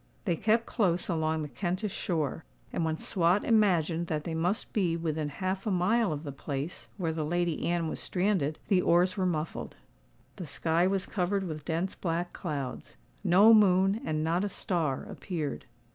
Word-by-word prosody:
They 175 -5 +2
kept 220 +6 +2
close 180 -6 0
along 160 -2 0
the - - -4
Kentish 185 +5 -3
shore; 155 -6 -2 0.3
and 170 - 0
when 160 -1 0
Swot 180 +4 +1
imagined 175 -7 +2
that 155 -2 -2
they 165 - -4
must 175 +6 -1
be 175 -6 +1
within 155 -2 -2
half 190 +6 -3
a - - +2
mile 200 +3 +2
of 150 0 -4
the 145 - -5
place 140 +3 -5
where 165 -5 -1
the 160 -1 -2
Lady 175 +1 0
Anne 170 -1 0
was - - -4
stranded, 180 -6 0
the 185 -3 +4
oars 180 +2 +3
were 190 -2 +1
muffled. 160 -2 -3 0.6
The 175 - -6
sky 165 +4 +1
was 195 0 0
covered 195 +1 -1
with 155 -5 -5
dense 170 +3 -1
black 175 0 -2
clouds: 145 -7 -5 0.3
no 200 +4 +7
moon 195 0 +4
and 155 0 -1
not 170 +4 +1
a 205 - -1
star 165 -8 -1
appeared. 160 -7 -5
175 Hz, 175 wpm, -29 LUFS, 160-190 Hz, 0.6 s, no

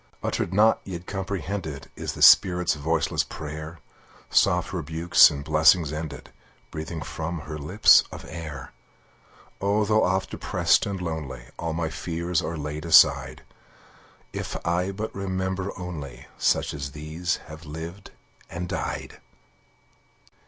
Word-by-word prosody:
Uttered - - -1
not, 105 +3 +4
yet 90 -2 -7
comprehended, 95 -6 -5
Is - - -4
the - - -1
spirit's 90 -3 +6
voiceless 80 +3 0
prayer, 80 +1 -8 0.5
Soft - - +2
rebukes, 80 +3 +5
in 70 -3 -6
blessings 80 +1 +4
ended, 75 -2 -6 0.4
Breathing 80 0 -5
from 80 +4 -5
her 75 +1 -7
lips 90 +9 +6
of - - -9
air. 75 -3 -7 0.9
Oh, 100 +2 +2
though 110 +1 +3
oft 95 +1 0
depressed - - +1
and 100 -2 -3
lonely, 75 -8 -5
All 85 -1 -2
my 80 -1 -2
fears 85 0 -2
are 85 +1 -4
laid 75 +1 -5
aside, 85 -1 +5 0.9
If - - -4
I 90 +2 +1
but 110 +3 -5
remember 95 0 -3
only 85 -7 -7
Such - - +1
as 70 -1 -6
these 80 +4 -2
have 80 +1 -11
lived 80 +5 -8 0.4
and 90 +1 -5
died! - - -4
85 Hz, 130 wpm, -25 LUFS, 75-95 Hz, 0.9 s, spirit's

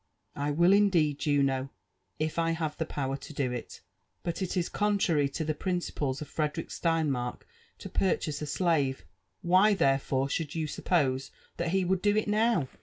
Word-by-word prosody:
*' - - -43
I 145 +1 -1
will 170 +6 +4
indeed, 170 -8 +3
Juno, 135 -3 +1 0.5
if 155 +2 -1
I 165 0 +2
have 160 -2 -2
the 160 - -3
power 135 -3 -2
to 150 - -10
do 135 -3 -1
it. 125 -2 -6 0.4
But 170 +2 -3
it 185 0 -2
is 175 - +1
con 210 -1 +1
trary 150 -7 +2
to 160 - -2
the 155 - 0
principles 150 -5 -2
of - - -11
Frederick 155 +1 -2
Steinmark 150 -8 -1 0.4
to - - -8
purchase 155 -5 0
a 150 - -3
slave 145 -4 0 0.2
— - - -49
why 205 +3 +6
therefore 135 -4 +1
should 150 +2 -3
you 160 -1 -1
suppose 135 -4 0 0.3
that 170 - -1
he 190 +1 +1
would 185 +1 +1
do 205 0 +3
it 215 - +1
now 215 - +2
155 Hz, 185 wpm, -29 LUFS, 140-180 Hz, 0.5 s, why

